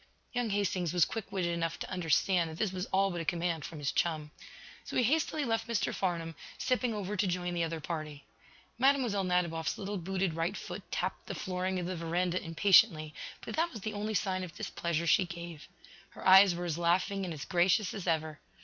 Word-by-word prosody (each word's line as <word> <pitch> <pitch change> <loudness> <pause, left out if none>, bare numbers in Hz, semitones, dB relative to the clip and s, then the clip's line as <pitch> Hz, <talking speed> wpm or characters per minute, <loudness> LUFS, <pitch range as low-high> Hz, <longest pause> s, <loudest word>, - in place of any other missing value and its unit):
Young 245 -2 0
Hastings 190 -4 0
was 175 -3 +5
quick 220 -3 -6
witted 180 -3 0
enough 165 0 -1
to - - -6
understand 175 0 +2
that 160 - -8
this 215 -1 0
was 185 0 -3
all 195 +1 +2
but 175 -1 -3
a - - -3
command 170 -3 -1
from 165 - -7
his 145 -2 -1
chum. 155 -3 -1 0.5
So - - -7
he 250 - +4
hastily 305 +3 +1
left 225 -1 0
Mr. 230 -2 0
Farnum, 170 -3 -2 0.2
stepping 250 -2 +1
over 210 -1 -3
to 200 0 +1
join 180 0 -1
the 170 -1 0
other 165 0 -2
party. 155 -3 -5 0.6
Mlle. 255 -7 +3
Nadiboff's 175 -3 0
little 200 0 -4
booted 190 0 -1
right 165 +5 -1
foot - - -6
tapped - - -3
the - - -4
flooring 185 0 -2
of 180 - -2
the 185 +1 -3
veranda 175 +2 0
impatiently, 165 -2 +4 0.3
but - - -5
that 335 +2 +2
was 220 - -8
the 215 +2 -3
only 210 +1 -2
sign 185 -2 0
of 175 -2 -8
displeasure 170 -1 -2
she 170 +3 +5
gave. 170 -3 -8 0.4
Her - - -6
eyes 190 -1 +8
were 175 +1 -4
as 170 -1 -2
laughing 185 +3 +1
and 180 - -3
as 150 -3 -6
gracious 185 +2 +2
as 195 -3 -6
ever. 155 -2 0
180 Hz, 205 wpm, -31 LUFS, 165-200 Hz, 0.6 s, eyes